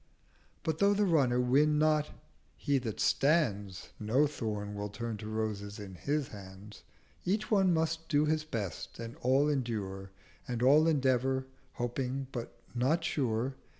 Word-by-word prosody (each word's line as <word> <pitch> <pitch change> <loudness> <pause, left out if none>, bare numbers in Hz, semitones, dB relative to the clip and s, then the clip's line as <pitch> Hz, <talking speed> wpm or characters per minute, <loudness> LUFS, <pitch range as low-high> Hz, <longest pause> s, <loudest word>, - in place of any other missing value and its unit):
— - - -35
But 160 -1 -1
though 200 0 +4
the 205 0 +3
Runner 140 -9 +3
win 145 +5 +3
not, 155 -1 +3 0.5
he 140 +2 +1
that 115 -4 -5
stands, 105 - +1
No 120 +8 +3
Thorn 105 -7 -3
will 105 0 -4
turn 115 +2 -4
to 105 +1 -7
Roses 105 -2 -3
in 100 -2 -8
his 140 - -2
Hands: 100 +1 -11 0.4
Each 205 +5 -1
one 195 -3 +4
must 160 0 0
do 150 -1 +3
his 155 0 +1
best 105 - -5
and 115 0 -7
all 135 +4 +3
endure, 105 -9 -2 0.4
And 120 -1 -2
all 150 +5 +6
endeavour, 130 -3 +2 0.3
hoping 125 +2 -2
but 120 -1 -6
not 135 +8 +1
sure. 125 -3 0
130 Hz, 150 wpm, -31 LUFS, 110-150 Hz, 0.5 s, all